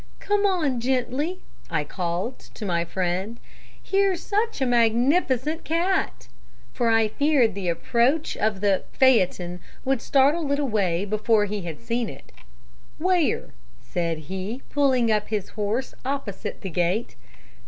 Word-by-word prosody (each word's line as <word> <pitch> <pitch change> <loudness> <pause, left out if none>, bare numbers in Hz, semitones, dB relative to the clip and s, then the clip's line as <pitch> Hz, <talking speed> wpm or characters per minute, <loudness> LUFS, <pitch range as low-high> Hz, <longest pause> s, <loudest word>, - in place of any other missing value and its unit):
"'Come 410 0 +2
on 310 -10 +1
gently,' 265 +8 -1 0.3
I 160 -3 0
called 175 - -3 0.2
to 215 - -6
my 170 -3 +1
friend; 185 +6 -2 0.4
'here's 390 -3 +1
such 430 0 0
a 265 - +1
magnificent 255 +5 +2
cat!' 335 - 0 0.5
for 235 - +1
I 225 -1 +4
feared 275 -2 +2
the 190 -2 -2
approach 240 - +1
of 210 -2 0
the 200 -2 +2
phaeton 180 -8 +3 0.3
would 265 -2 +1
startle 285 +2 +3
it 285 - +2
away 205 -10 0
before 215 +1 +2
he 205 0 -3
had 165 -4 -6
seen 235 -1 -2
it. - - -12 0.7
"'Where?' 355 -2 +1 0.3
said 170 -2 -2
he, 195 +7 -4
pulling 260 -5 +3
up 210 -1 +1
his 210 -3 -2
horse 220 +5 -2
opposite 265 -7 -4
the 190 - -5
gate. 180 +7 0
235 Hz, 135 wpm, -25 LUFS, 195-280 Hz, 0.7 s, I